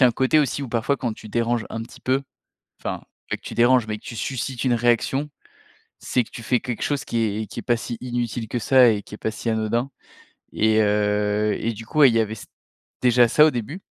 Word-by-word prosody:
y - - +9
a - - +7
un - - +2
côté 130 +6 +2
aussi 140 0 -1
où, 130 - -5
parfois, 120 +4 0
quand 120 -3 -2
tu 110 - -11
déranges 115 0 0
un 115 - -4
petit 115 - -13
peu, 130 +2 0 0.6
enfin, - - -4 0.3
pas - - 0
que - - -15
tu - - -8
déranges 120 0 +4
mais 105 - -3
que - - -21
tu 115 - -7
suscites 130 +1 -3
une 125 -2 +2
réaction, 120 +5 +1 0.7
c'est 125 - 0
que - - -19
tu 115 - -9
fais 125 +1 +2
quelque 120 -3 -5
chose 145 0 -1
qui 115 - -3
est 110 0 -2
qui - - -6
est - - -5
pas 120 -2 +1
si 120 0 -5
inutile 120 -2 -3
que 120 - -2
ça 125 +2 +6
et 105 -2 0
qui 105 - -10
est - - -13
pas 110 - -2
si 115 +1 -4
anodin 115 +4 0 0.6
et 110 0 +3
heu 105 0 +1
et 115 - -1
du 115 +1 -9
coup, 150 +4 +3
il 125 - +7
y 115 - +4
avait 110 0 -1
ç - - -10 0.6
déjà 125 -1 +5
ça 150 +6 +6
au 155 - +5
début, 140 - -5
120 Hz, 250 wpm, -23 LUFS, 110-130 Hz, 0.7 s, y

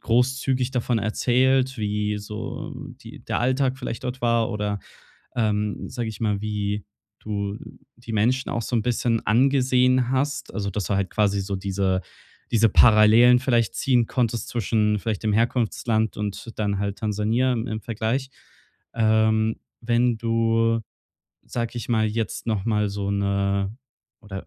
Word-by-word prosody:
großzügig 130 +2 +1
davon 125 -2 0
erzählt, 130 +4 +2
wie 105 -1 -1
so 105 +1 -6 0.3
die - - -12
der - - -1
Alltag 130 +1 +1
vielleicht 125 -2 -6
dort 125 +1 -4
war 115 -1 +2
oder, 105 -2 -2 0.6
ähm, 105 -3 -1
sage 120 -2 -4
ich 110 -2 -8
mal, 105 -3 0
wie 105 -1 -2 0.3
du 100 -1 -3 0.4
die 120 -1 -9
Menschen 125 +5 +1
auch 115 - -2
so 120 - -2
'n 110 - +1
bisschen 120 -1 0
angesehen 130 +1 +3
hast. 140 +2 -1
Also, 100 -2 -2
dass 100 +1 -3
du 100 - -1
halt 95 -2 -1
quasi 100 -2 +1
so 95 0 -3
diese 95 -1 -1 0.5
diese 115 -1 +4
Parallelen 115 +3 +6
vielleicht 120 -4 +1
ziehen 125 -3 +2
konntest 120 -3 -1
zwischen 105 -2 +1
vielleicht 105 -1 -3
dem 110 -1 +1
Herkunftsland 110 -1 0
und 105 +2 -4
dann 100 -2 0
halt 100 0 -3
Tansania 110 +4 0
im 115 0 -3
im 110 -2 -4
Vergleich. 115 +5 -2 0.7
Ähm, 110 0 +2 0.2
wenn 120 0 +1
du, 115 0 +1 0.6
sage 115 -1 -3
ich - - -7
mal, 110 -2 +2
jetzt 110 +1 -3
noch 105 -4 -1
mal 105 -2 +1
so 100 0 -3
'ne 100 0 0 0.5
oder 100 -4 -8
110 Hz, 150 wpm, -24 LUFS, 105-120 Hz, 0.7 s, Parallelen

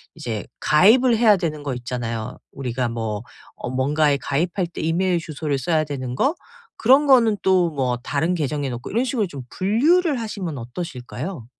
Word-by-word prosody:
이제 120 -10 -4 0.2
가입을 230 +10 +5
해야 220 -2 +6
되는 155 -4 -3
거 140 -2 -2
있잖아요. 120 -1 -4 0.2
우리가 125 -2 -2
뭐 110 -3 -3 0.3
어 - - -6
뭔가에 145 +3 +2
가입할 170 +6 -1
때 170 - -10
이메일 175 +2 +1
주소를 155 -3 -3
써야 155 +3 +1
되는 130 -4 -5
거, 275 - +1 0.4
그런 265 +6 +5
거는 235 -5 +5
또 185 -2 +3
뭐 130 -4 -1
다른 145 +7 -1
계정에 145 -3 -2
놓고 120 -1 -6
이런 235 +4 +1
식으로 245 -6 -1
좀 145 -6 -8
분류를 280 - +2
하시면 190 -9 -4
어떠실까요? 125 +2 -6
155 Hz, 345 characters per minute, -22 LUFS, 130-195 Hz, 0.4 s, 해야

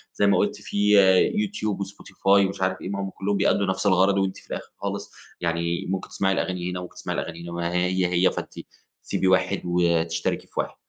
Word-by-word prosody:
زي 100 - +3
ما 100 -2 +4
قُلْتِ 105 +2 0
في 105 +2 +2 0.4
Youtube 205 - -1
وSpotify 95 -1 -16 0.2
ومش 95 - -7
عارف 95 0 0
إيه، - - -5
ما 100 0 -3
هم 95 - -3
كلهم 100 +1 -2
بيأدُّوا 100 0 +2
نَفْس 95 +1 -1
الغَرض، 95 +1 +4
وأنتِ 95 -1 0
في - - -16
الآخر - - -6
خالص 100 0 -4 0.3
يعني 85 0 -1
ممكن 95 0 -3
تسمعي 95 0 0
الأغاني 90 -1 -2
هنا، 90 0 -4
ممكن 90 - -10
تسمعي - - -4
الأغاني 85 0 -5
هنا 85 - -7
ما 85 0 -2
هي 90 +1 +1
هي 90 +1 +3
فأنتِ - - -6 0.5
سيبي 95 - -1
واحد 95 +1 +2
وتشتركي 85 -1 0
في - - -32
واحد، - - -2
95 Hz, 205 wpm, -24 LUFS, 90-100 Hz, 0.5 s, ما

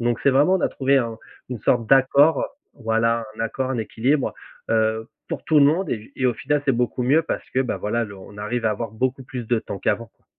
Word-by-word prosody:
donc 120 0 0
c'est 140 - +5
vraiment, 145 +8 +4
on 190 - +1
a - - +3
trouvé 135 +1 +1
un 115 -2 -3 0.3
une 120 -5 -5
sorte 115 -1 +1
d'accord, 135 +4 +5 0.3
voilà, 115 -1 0
un - - -8
accord, 130 +4 -2
un 130 - -1
équilibre, 125 +6 0 0.4
heu, 110 0 +1 0.2
pour - - -5
tout 155 -2 +4
le 140 - +7
monde 170 +6 +1
et 110 - -2
j 110 +6 -17
et 130 - +1
au 120 - +1
final, 145 +3 -1
c'est 135 - +3
beaucoup 125 +1 -1
mieux 145 +6 +4
parce - - -4
que, 130 - +1
bah, 130 - -1
voilà, 115 +3 -1
le 100 -2 -10
on 100 +2 -13
arrive 115 +3 -3
à 110 - +3
avoir 110 +1 -3
beaucoup 130 +4 -1
plus 125 -3 -6
de 120 -1 +2
temps 100 - -7
qu'avant, 115 +3 -1
quoi. - - -40
120 Hz, 250 wpm, -23 LUFS, 115-135 Hz, 0.4 s, le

